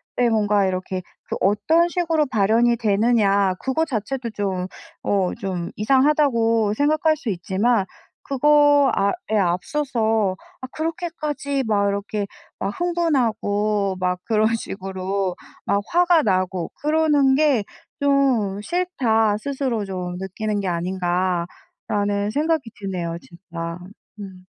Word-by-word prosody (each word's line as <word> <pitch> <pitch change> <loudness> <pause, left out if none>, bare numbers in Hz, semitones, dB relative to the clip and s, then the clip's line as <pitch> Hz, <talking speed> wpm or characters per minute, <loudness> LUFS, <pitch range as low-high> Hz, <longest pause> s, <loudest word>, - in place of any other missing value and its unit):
네 245 -1 +2
뭔가 210 -3 +2
이렇게 185 0 -3 0.3
그 - - -2
어떤 210 - +3
식으로 330 -3 +1
발현이 230 +4 +3
되느냐 205 -3 +2
그거 265 +5 0
자체도 240 -1 -3
좀 190 -3 -2 0.4
어 195 -3 +1
좀 185 -4 -3
이상하다고 230 -3 +2
생각할 310 +4 +2
수 270 -6 -5
있지만 195 +4 +1 0.4
그거 290 0 +4
아 200 - +2 0.2
예 215 - +3
앞서서 220 - 0 0.2
아 255 - -5
'그렇게까지 310 -4 -3
막 200 -2 +2
이렇게 200 +1 -2 0.3
막 195 - -2
흥분하고 220 - 0
막 180 -1 0
그런 220 0 +2
식으로 190 -2 -3 0.3
막 200 - +2
화가 350 -1 +4
나고 185 -3 0
그러는 295 -3 +3
게 285 -7 +3 0.4
좀 260 -8 +2
싫다.' 225 - +1
스스로 260 -4 -2
좀 180 -2 -5
느끼는 205 +3 -3
게 195 - -3
아닌가라는 185 +3 -2
생각이 305 -3 0
드네요 180 -4 -3
진짜. 170 -1 -7 0.4
음. 190 -2 -10
215 Hz, 245 characters per minute, -22 LUFS, 195-275 Hz, 0.4 s, 그거